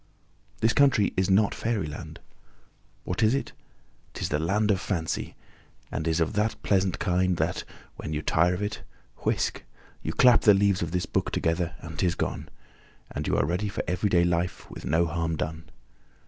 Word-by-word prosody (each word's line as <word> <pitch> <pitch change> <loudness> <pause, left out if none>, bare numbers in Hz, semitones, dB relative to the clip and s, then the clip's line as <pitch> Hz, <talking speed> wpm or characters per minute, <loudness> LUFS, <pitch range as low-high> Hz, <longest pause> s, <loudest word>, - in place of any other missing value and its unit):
This 110 0 +3
country 135 -7 +4
is 95 -1 +1
not 100 +2 +4
Fairyland. 100 -11 -3 0.8
What 90 - -3
is 110 +3 +4
it? 140 - -3 0.6
'Tis - - -2
the 75 - 0
land 105 +6 +1
of 95 -2 0
Fancy, 80 -5 -2 0.6
and 80 - -3
is 80 0 +1
of 80 +3 +1
that 105 +2 +1
pleasant 95 -2 +2
kind 90 -1 +1
that, - - -1 0.3
when - - -6
you 75 0 -2
tire 85 +2 +3
of 95 - -3
it 105 +1 -3 0.4
whisk! - - -1 0.4
you - - -3
clap 125 -2 +6
the 105 -2 +6
leaves 100 -1 +2
of 85 - -1
this 90 0 -1
book - - -1
together 85 +1 -1
and 80 -3 -8
'tis 90 -2 +1
gone, - - -3 0.6
and - - -4
you - - +1
are - - +2
ready 90 +7 -1
for 100 - -3
everyday 90 -1 +2
life, 85 0 -1
with - - -8
no 80 +3 +2
harm 80 0 -1
done. 80 +1 -5
90 Hz, 175 wpm, -27 LUFS, 80-105 Hz, 0.8 s, clap